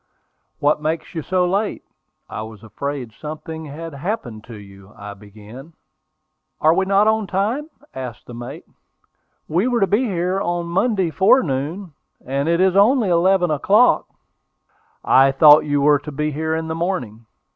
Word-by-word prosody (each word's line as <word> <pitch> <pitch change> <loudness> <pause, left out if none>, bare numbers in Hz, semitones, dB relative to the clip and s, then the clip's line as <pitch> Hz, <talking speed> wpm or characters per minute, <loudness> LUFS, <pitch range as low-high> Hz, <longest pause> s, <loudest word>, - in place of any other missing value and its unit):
"What 150 +1 +1
makes 160 +2 -3
you 165 - -3
so 180 +3 0
late? 200 +4 -2 0.4
I - - -6
was 110 -1 -10
afraid 125 +3 -5
something 155 +3 -8
had 155 +2 -8
happened 140 - -5
to 115 - -10
you," 100 -1 -14
I 100 0 -8
began. 105 +9 -14 0.9
"Are 160 +1 +4
we 190 +2 +1
not 200 +2 +3
on 220 -2 +1
time?" 220 - -2 0.2
asked 125 -4 -8
the 125 - -11
mate. 120 +1 -9 0.8
"We 180 +9 0
were 245 -2 +1
to 195 - +3
be 210 +7 +1
here 185 -2 -1
on 175 -2 -2
Monday 190 0 0
forenoon; 170 - +1 0.3
and 140 +4 -2
it 170 0 +2
is 190 0 +3
only 220 +2 +4
eleven 175 0 +2
o'clock." 200 - +3 1.0
"I 135 +1 +5
thought 150 +2 +6
you 145 -1 0
were 145 0 +4
to 150 +1 -9
be 150 +2 -2
here 160 +2 -2
in 160 0 -3
the 160 - -3
morning." 125 - -4
160 Hz, 160 wpm, -20 LUFS, 135-190 Hz, 1.0 s, thought